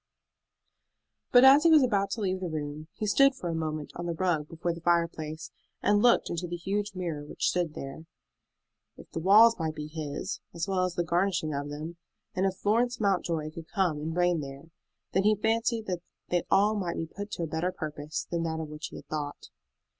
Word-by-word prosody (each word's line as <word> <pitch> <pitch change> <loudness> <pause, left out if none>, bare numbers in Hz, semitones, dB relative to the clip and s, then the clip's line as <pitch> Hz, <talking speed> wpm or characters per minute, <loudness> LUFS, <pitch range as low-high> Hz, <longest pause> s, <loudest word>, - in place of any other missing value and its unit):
But 245 0 +8
as 275 +2 +9
he 335 - +6
was 310 -3 +7
about 200 -5 +1
to 225 - -4
leave 190 -2 0
the 185 -2 -3
room 150 0 -5
he 215 - -4
stood 275 +6 +5
for 180 -9 -5
a - - -1
moment 155 -2 -3
on 175 0 -5
the 170 - -2
rug 160 -4 0
before 170 +2 -3
the 170 - -10
fireplace 165 -2 -1 0.3
and 205 0 +4
looked 240 0 +4
into 175 +1 -3
the 175 - -4
huge 200 +4 -2
mirror 170 -5 -3
which 145 - -2
stood 175 -4 -1
there. 135 +4 -7 0.9
If - - -14
the - - -3
walls 215 +6 +6
might 160 -1 -2
be 150 - -5
his, 155 +4 -5 0.2
as 170 +2 -2
well 185 -2 +1
as 180 -1 -4
the 175 - +1
garnishing 170 -2 0
of 145 +1 -3
them, 155 +4 -6 0.4
and 190 +1 +1
if 190 - -2
Florence 235 +5 +1
Mountjoy 170 -6 0
could 160 0 -9
come 180 -6 0
and 160 +3 -4
reign 175 -1 +3
there, 140 +3 -9 0.4
then 190 - +2
he 210 +2 +4
fancied 225 +2 0
that 180 -3 -3 0.3
they 175 -1 +1
all 205 +2 +4
might 185 -5 -2
be 165 - -2
put 205 +5 -7
to 170 - -3
a - - 0
better 160 +3 -1
purpose 150 -2 -5
than 170 -1 0
that 160 -1 -2
of 160 -1 -5
which 150 +1 -6
he - - -12
had - - -9
thought. 145 -2 -5
175 Hz, 215 wpm, -29 LUFS, 155-200 Hz, 0.9 s, as